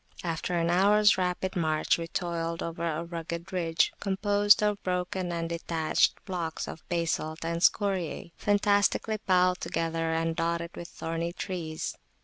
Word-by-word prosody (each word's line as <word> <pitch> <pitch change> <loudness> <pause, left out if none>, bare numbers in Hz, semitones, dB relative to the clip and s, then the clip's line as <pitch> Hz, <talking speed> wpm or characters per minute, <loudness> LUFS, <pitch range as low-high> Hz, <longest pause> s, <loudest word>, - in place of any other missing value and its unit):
After 170 +1 -2
an 170 0 +1
hours 205 +3 +5
rapid 185 0 -1
march 155 -2 +1
we 165 - -4
toiled 170 -1 -2
over 170 0 -3
a 165 0 -2
rugged 170 +2 -6
ridge, 165 -3 +1
composed 205 +1 +3
of 210 -1 +1
broken 180 0 -2
and 165 -1 -2
detached 165 -1 0
blocks 170 -4 -3
of 160 - -7
basalt 165 -2 -1
and 170 0 -2
scoriæ, 185 -5 +1
fantastically 205 +1 +2
piled 180 -2 +2
together, 165 0 -1
and 165 0 0
dotted 170 +1 -1
with 170 - -7
thorny 165 +1 -3
trees. 165 -4 -4
170 Hz, 140 wpm, -28 LUFS, 165-185 Hz, -, hours